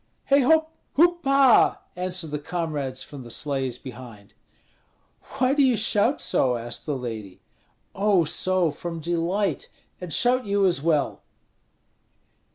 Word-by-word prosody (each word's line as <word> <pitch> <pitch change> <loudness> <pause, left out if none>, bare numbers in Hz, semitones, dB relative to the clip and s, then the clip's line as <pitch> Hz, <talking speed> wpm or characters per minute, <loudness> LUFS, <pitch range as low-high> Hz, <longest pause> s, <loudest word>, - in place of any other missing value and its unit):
"Hei 280 - +7
hop! 315 +4 +3 0.2
hoop 345 +2 +3
ha!" 275 -2 +4
answered 180 -3 -4
the 150 - -3
comrades 150 -5 -4
from 145 -3 -10
the 120 - -11
sleighs 135 -2 -3
behind. 120 -6 -11 1.0
"Why 255 +1 +2
do 290 - +2
you 255 -4 +3
shout 220 +4 +1
so?" 125 -2 +1
asked 120 +3 -7
the 145 -3 -1
lady. 110 -6 -7 0.5
"Oh, 195 -3 +3
so, 185 +1 0
from 165 +3 -6
delight! 170 +1 -1 0.3
And 180 -2 -7
shout 245 - +2
you 200 0 +2
as 175 -7 +1
well!" 150 -3 0
170 Hz, 135 wpm, -24 LUFS, 135-215 Hz, 1.0 s, Hei